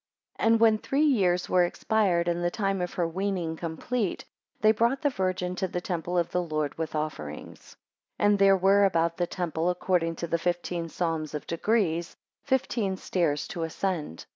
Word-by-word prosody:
AND 225 0 +3
when 220 -1 +5
three 275 +6 0
years 185 -10 +2
were 180 -1 +4
expired, 175 -1 +1
and 175 0 0
the 175 - +2
time 195 -1 -1
of 180 - -4
her 175 -2 +1
weaning 180 -2 -2
complete, 175 +6 -3 0.3
they 215 +1 +5
brought 235 +6 +1
the 290 - +3
Virgin 185 -3 -1
to 190 - -1
the 180 - -3
temple 175 0 -3
of 170 -1 0
the 180 - +1
Lord 155 -3 -2
with 160 -1 -4
offerings. 140 - -6 0.4
2 - - +1
And 205 -1 +4
there 195 -1 +6
were 195 +2 +4
about 170 -3 +2
the 175 - 0
temple, 170 -2 -2
according 175 -2 0
to 170 - -4
the 170 0 -1
fifteen 175 -1 -2
Psalms 160 -3 -2
of 150 - -5
degrees, 170 -2 0 0.2
fifteen 245 -8 0
stairs 165 -6 -1
to 175 - -5
ascend. 165 - -3
180 Hz, 180 wpm, -27 LUFS, 165-200 Hz, 0.4 s, there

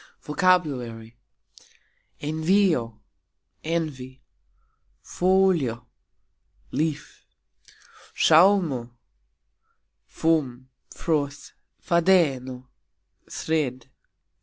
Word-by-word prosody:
VOCABULARY. 140 - 0 1.1
envio: 155 - +1 0.6
envy. 135 -6 -4 0.8
folio: 180 -11 +1 0.9
leaf. 155 -2 -3 0.9
sxauxmo: 160 -9 +3 1.1
foam, 130 -6 -1 0.2
froth. 145 -4 -3 0.3
fadeno: 145 -8 +1 0.6
thread. 130 -5 -3
150 Hz, 40 wpm, -24 LUFS, 125-170 Hz, 1.1 s, sxauxmo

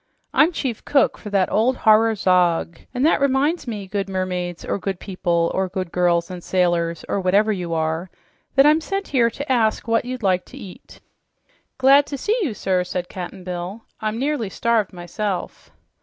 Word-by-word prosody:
"I'm 320 +4 +5
chief 260 -9 -4
cook 280 -2 +2
for 210 - -8
that 195 -2 +1
old 245 +4 +2
horror 220 +1 +4
Zog. 175 -4 +2
And 250 +3 0
that 320 - +3
reminds 280 +4 +1
me, 210 -4 -4
good 195 +1 -3
mermaids, 180 -2 -3
or - - -2
good 195 -2 -3
people, 170 -3 -1
or 190 0 0
good 185 -2 -4
girls 175 -1 +1
and 180 -1 -7
sailors, 175 -2 0
or 200 - -1
whatever 200 +4 +3
you 175 -4 -3
are, 160 +3 -1 0.5
that 270 +1 +6
I'm 305 +2 +5
sent 390 +4 -3
here 240 -4 +3
to 280 +4 -5
ask 230 -2 +1
what 230 0 +2
you'd 250 -1 -6
like 185 -2 +2
to 270 - -13
eat." 200 -9 -12 0.8
"Good 275 +2 +5
to 280 - -4
see 420 - 0
you, 275 - -1
sir," 185 -2 0
said 180 0 -4
Cap'n 185 0 -7
Bill. 180 +4 -5 0.2
"I'm 215 0 -2
nearly 265 -5 -1
starved, 225 0 0
myself." 180 +2 -5
200 Hz, 185 wpm, -22 LUFS, 180-250 Hz, 0.8 s, that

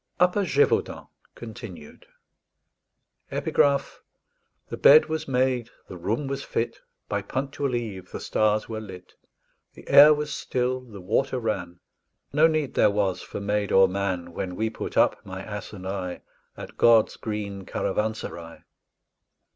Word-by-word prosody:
UPPER 180 +3 +3
GÉVAUDAN 145 -4 +1 0.3
(Continued) 110 -9 -10 1.2
_The - - -3 1.4
bed 150 +2 +8
was 155 0 -4
made, 125 -2 0 0.2
the - - -9
room 105 +11 -2
was 135 0 -4
fit, 115 - -3 0.3
By 100 - -1
punctual 135 +4 -3
eve 100 -6 -5
the - - -6
stars 110 0 +1
were 110 -1 -5
lit; 95 -4 -11 0.6
The - - -15
air 145 +2 +9
was 150 -1 0
still, 125 0 -1
the 115 -6 -12
water 130 +8 0
ran; 85 -6 -4 0.5
No 155 +3 +6
need 155 -4 -1
there 105 - +4
was 100 -3 0
for - - -7
maid 105 0 -1
or 95 0 +6
man, 90 -3 -3
When 90 0 -4
we 110 +3 -1
put - - -6
up, - - +3
my 95 -1 -7
ass 105 0 -7
and 95 -3 -8
I, 95 -2 -4 0.4
At - - -10
God's 115 -2 +5
green 105 -3 -5
caravanserai. 95 -5 -3
110 Hz, 140 wpm, -25 LUFS, 95-130 Hz, 1.4 s, air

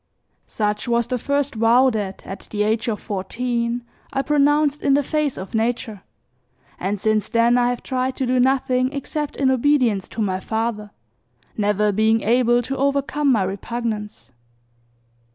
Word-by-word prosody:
Such 210 +1 -2
was 235 0 +2
the 250 +1 -2
first 280 +2 -1
vow 235 +3 +4
that, 205 -4 -4
at 195 - -8
the 210 -1 -1
age 220 +3 0
of 215 -3 -1
fourteen, 235 +4 -2 0.3
I 270 0 -1
pronounced 295 +1 +2
in 275 -1 +3
the 290 - +2
face 300 -1 -1
of 190 - -8
nature, 225 -2 -1 0.8
and 195 +2 -2
since 215 +1 0
then 235 +1 +3
I 245 0 +3
have 245 -1 -3
tried 260 0 -2
to 265 - -1
do 255 +1 +1
nothing 255 0 +2
except 290 +1 -4
in 265 -2 +2
obedience 255 -7 +2
to 225 - -4
my 190 -2 -1
father, 220 +1 -3 0.7
never 210 0 +1
being 220 +2 +2
able 240 +1 +3
to 270 +3 -4
overcome 280 +1 +1
my 220 -6 +3
repugnance. 210 - -4
235 Hz, 155 wpm, -21 LUFS, 215-265 Hz, 0.8 s, vow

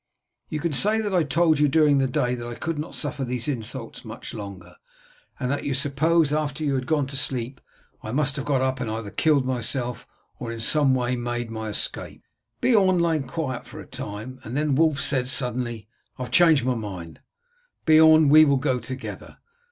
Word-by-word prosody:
You 155 - -3
can 165 0 -2
say 210 +10 +4
that 210 -3 -2
I 180 - +4
told 155 +1 +2
you 150 - +4
during 145 -1 +4
the 135 - +2
day 125 -1 0
that 120 -1 -5
I 120 - -6
could 160 +2 -4
not 155 - -6
suffer 145 -2 -2
these 125 0 -3
insults 120 -2 -4
much 110 0 -8
longer, 100 -4 -9 0.6
and 125 -1 -1
that 145 - -2
you 140 - -1
suppose 145 +3 +2
that 150 - +2
after 150 0 -4
you 145 -2 0
had 130 -1 -2
gone 150 -3 +1
to 135 +1 -7
sleep 130 -1 -2 0.4
I 110 - -6
must 140 +1 +1
have 140 - -4
got 135 -3 +1
up 130 0 -1
and 120 -3 -3
either 110 -2 -5
killed 150 -4 +2
myself 125 -1 -2 0.3
or 115 - -5
in 115 - -6
some 135 +3 +3
way 125 0 0
made 120 -1 -3
my 110 -1 -4
escape." 105 - -3 0.4
Beorn 195 -7 +4
lay 170 -2 +2
quiet 135 -2 -4
for - - -10
a - - -9
time 110 +6 -7
and 120 +5 -5
then 150 -1 +1
Wulf 155 0 +2
said 125 -1 -1
suddenly, 125 -4 -3 0.3
"I 130 - -4
have 125 - -7
changed 165 -7 +5
my 130 - +2
mind, 95 -8 -7 0.7
Beorn; 155 -1 +6
we 155 +2 +8
will 140 -2 +3
go 130 -1 0
together. 130 +3 -8
135 Hz, 205 wpm, -24 LUFS, 120-150 Hz, 0.7 s, we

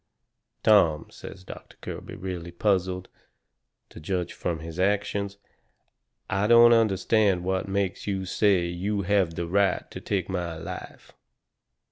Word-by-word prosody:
"Tom," 85 -8 +4
says 95 - -11
Doctor - - -11
Kirby, - - -7
really 90 -2 -5
puzzled, 95 0 0 0.8
to - - -12
judge 90 +2 -3
from 85 -2 -3
his 80 +2 -8
actions, 100 +1 0 0.9
"I 100 +2 0
don't 120 +1 +8
understand 105 -3 +2
what 95 +1 -1
makes 95 0 -2
you 95 -2 -2
say 95 -1 +2
you 95 +4 -2
have 95 -3 +1
the 85 - -2
right 95 +2 +1
to - - -8
take 100 -2 -2
my 90 -3 -3
life." - - -9
95 Hz, 130 wpm, -26 LUFS, 90-100 Hz, 0.9 s, don't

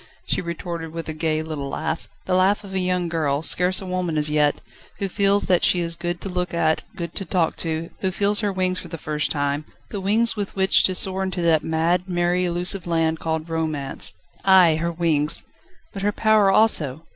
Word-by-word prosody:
she - - -1
retorted 170 -1 -5
with 165 0 -6
a 160 - -4
gay 155 0 -1
little 150 -3 -5
laugh, 160 - -4 0.2
the 185 - -1
laugh 190 +3 +2
of 195 -1 -10
a 190 - 0
young 180 -1 0
girl, 155 -3 -1
scarce 180 +2 +4
a - - -7
woman 180 -3 -2
as 150 0 +1
yet, 150 -1 +2 0.4
who 195 - -2
feels 200 +1 +1
that 180 -2 +2
she 180 - +4
is 170 -1 -2
good 175 0 -4
to - - -6
look 180 -2 -3
at, 160 -2 +1
good 170 -1 -6
to - - -5
talk 170 -2 0
to, 165 0 -3
who 190 - 0
feels 200 +2 +1
her 205 -2 0
wings 185 -1 0
for - - -9
the 165 - -7
first 150 -1 -2
time, 145 0 0 0.3
the 200 - -4
wings 220 +5 +2
with 205 -2 -4
which 190 0 +4
to 185 - +1
soar 190 +1 0
into 185 -2 -2
that 160 -2 +3
mad, 170 +3 0
merry, 175 +1 +1
elusive 175 +1 0
land 160 -1 0
called 160 0 -3
Romance. 155 -4 -2 0.3
Ay, 185 -5 +5
her 170 +1 -2
wings! 160 -3 +2 0.5
but 195 - -6
her 205 +1 +1
power 215 -1 +3
also! 165 -8 +2
175 Hz, 210 wpm, -22 LUFS, 160-190 Hz, 0.5 s, Ay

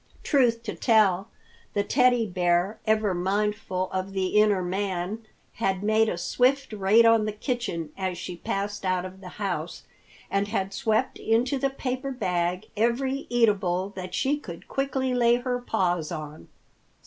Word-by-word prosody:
Truth 240 -5 +2
to 210 - -4
tell, 210 -4 +3 0.5
the 205 - +2
Teddy 245 +1 +3
Bear, 180 +2 +1
ever 215 -2 +2
mindful 190 0 -1
of 190 +1 -3
the 190 -1 0
inner 210 -2 +3
man, 190 +3 -3 0.3
had 195 -3 -1
made 220 +1 +3
a 175 - -2
swift 255 +7 +1
raid 210 +3 +4
on 230 -1 +5
the 215 - -1
kitchen 210 - -3
as 185 -2 -3
she 180 0 -6
passed 200 +3 -3
out 185 -1 0
of 185 +1 -10
the 185 - -9
house, 180 -5 -3 0.5
and 200 +1 +1
had 195 -2 -2
swept 220 -5 0
into 245 +5 +1
the 275 +1 +1
paper 265 0 -3
bag 180 -6 -1
every 255 +5 0
eatable 200 -6 +2
that 185 -2 -7
she 285 +2 +1
could 170 - -10
quickly 265 -1 -1
lay 240 -1 +4
her 245 0 -2
paws 180 -9 -1
on. 155 -2 -7
205 Hz, 155 wpm, -26 LUFS, 185-235 Hz, 0.5 s, on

